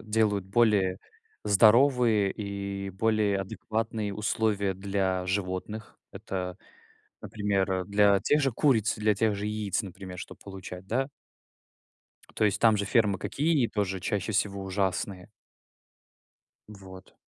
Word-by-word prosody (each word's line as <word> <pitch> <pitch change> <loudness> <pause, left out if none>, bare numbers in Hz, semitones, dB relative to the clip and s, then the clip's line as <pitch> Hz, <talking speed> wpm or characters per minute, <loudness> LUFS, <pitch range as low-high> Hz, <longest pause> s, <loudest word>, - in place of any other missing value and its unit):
делают 105 -3 +1
более 100 -3 +2 0.5
здоровые 115 0 +4
и 100 -1 -5
более 105 0 +1
адекватные 110 +1 -3
условия 105 -2 0
для 95 -1 -1
животных. 95 +3 -4
Это, 90 -1 -5 0.6
например, 95 -3 -1
для 100 0 +4
тех 150 +7 +2
же 135 - +1
куриц, 115 -4 +2
для 105 -1 +2
тех 110 -1 +1
же 100 +1 -4
яиц, 105 -2 -1
например, 95 -1 -9
чтоб - - -9
получать, 95 -1 -9
да. 130 +5 0 1.3
То 110 - +2
есть 105 0 +1
там 110 -2 +5
же 100 - -1
фермы 100 -2 +2
какие? 145 -4 +1
Тоже 95 -3 -2
чаще 105 +3 -2
всего 100 -1 -1
ужасные. 95 0 -2 1.4
Вот. 95 -2 -13
100 Hz, 120 wpm, -28 LUFS, 95-110 Hz, 1.4 s, там